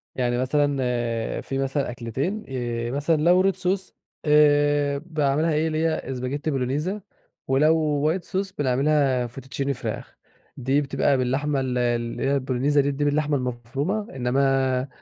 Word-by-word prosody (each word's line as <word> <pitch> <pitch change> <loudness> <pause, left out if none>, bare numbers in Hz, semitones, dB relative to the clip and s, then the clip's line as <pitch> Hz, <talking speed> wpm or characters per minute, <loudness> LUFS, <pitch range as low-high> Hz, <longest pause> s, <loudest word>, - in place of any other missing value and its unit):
يعني 120 -1 0
مثلًا 145 +2 +1 0.6
في 135 - -4
مثلًا 135 -1 -1
أكلتين 130 - -3
ي 120 -2 -3
مثلًا 145 +4 +1
لو 185 +4 +4
red - - -14
sauce، 185 0 -1 0.3
آآ، 145 -1 +4
باعملها 155 0 0
إيه، 155 +2 +1
اللي 160 0 0
هي 130 +2 -4
spaghetti 155 - -1
Bolognese، 150 +10 -1 0.5
ولو 150 +2 +2
white 185 - -3
sauce 195 0 -2
بنعملها 135 -1 +2
fettuccine 135 +3 -4
فراخ، 135 - -5 0.4
دي 135 +2 +1
بتبقى 140 0 +1
باللحمة 135 +3 0
ال 130 -1 -1
اللي 120 -1 -1
هي 140 +1 +2
ال 130 - -9 0.3
bolognese - - +8
دي 140 +1 +1
باللحمة 145 0 +1
المفرومة، 135 - -3
إنما 130 +1 +1
140 Hz, 140 wpm, -24 LUFS, 130-155 Hz, 0.6 s, bolognese